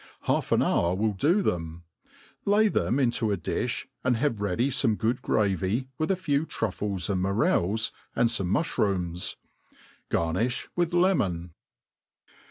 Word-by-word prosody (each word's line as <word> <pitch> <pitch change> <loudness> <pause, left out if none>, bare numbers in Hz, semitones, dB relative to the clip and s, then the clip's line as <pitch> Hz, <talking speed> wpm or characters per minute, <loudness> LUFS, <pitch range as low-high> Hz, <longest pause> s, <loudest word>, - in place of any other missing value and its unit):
Half - - 0
an - - +4
hour 85 +1 +1
will 105 +2 0
do 165 - +2
them. 80 - -2 0.6
Lay 210 +2 +4
them 130 - 0
into 120 -4 +1
a 100 - 0
diih, - - -2 0.2
and 125 -2 +2
have 115 -5 0
ready 105 +7 0
fome 115 -4 +1
good 115 +3 0
gravy, 100 +5 0
with 155 - 0
a 195 - +3
few 160 -4 0
trufles 100 -3 -2
and 95 -3 0
morels, 100 +2 +2 0.2
and 120 - +3
fome 110 -6 0
mulbrooms. 95 - 0 0.7
Ga^ 80 -1 0
nifli 120 +7 -1
with 175 -1 0
le 185 +2 +4
mon. 85 - -2
110 Hz, 150 wpm, -27 LUFS, 95-140 Hz, 0.7 s, an